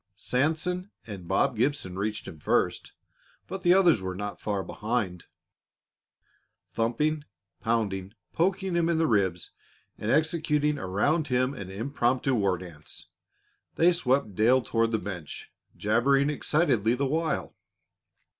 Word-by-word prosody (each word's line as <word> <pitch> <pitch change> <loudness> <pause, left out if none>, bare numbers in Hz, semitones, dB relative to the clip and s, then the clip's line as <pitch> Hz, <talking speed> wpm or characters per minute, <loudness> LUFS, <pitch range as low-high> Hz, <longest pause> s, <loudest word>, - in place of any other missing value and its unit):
Sanson 165 +8 0 0.2
and 95 -5 -8
Bob - - +2
Gibson 140 -11 0
reached 105 +2 -3
him 80 - -9
first, - - 0 0.5
but 190 - -6
the 175 0 +5
others 175 - +5
were 95 -1 -4
not 105 +1 -5
far 100 -2 -1
behind. 105 -6 -3 1.5
Thumping, 145 +7 0 0.4
pounding, 105 -4 -1 0.2
poking 190 +2 0
him 170 -1 +2
in 170 - +2
the 165 - +3
ribs 95 - +1 0.5
and 105 - -3
executing 150 0 +1
around 140 - +1
him 130 +1 +1
an 100 -9 -7
impromptu 125 +5 0
war 100 -6 +2
dance, 85 -4 -8 0.7
they 175 +2 +5
swept 130 - +1
Dale 120 +6 +4
toward 115 0 +1
the 110 - +2
bench, 90 -6 -7 0.3
jabbering 135 +7 +3
excitedly 135 - +1
the 140 +2 0
while. 160 +2 -1
125 Hz, 125 wpm, -27 LUFS, 100-155 Hz, 1.5 s, the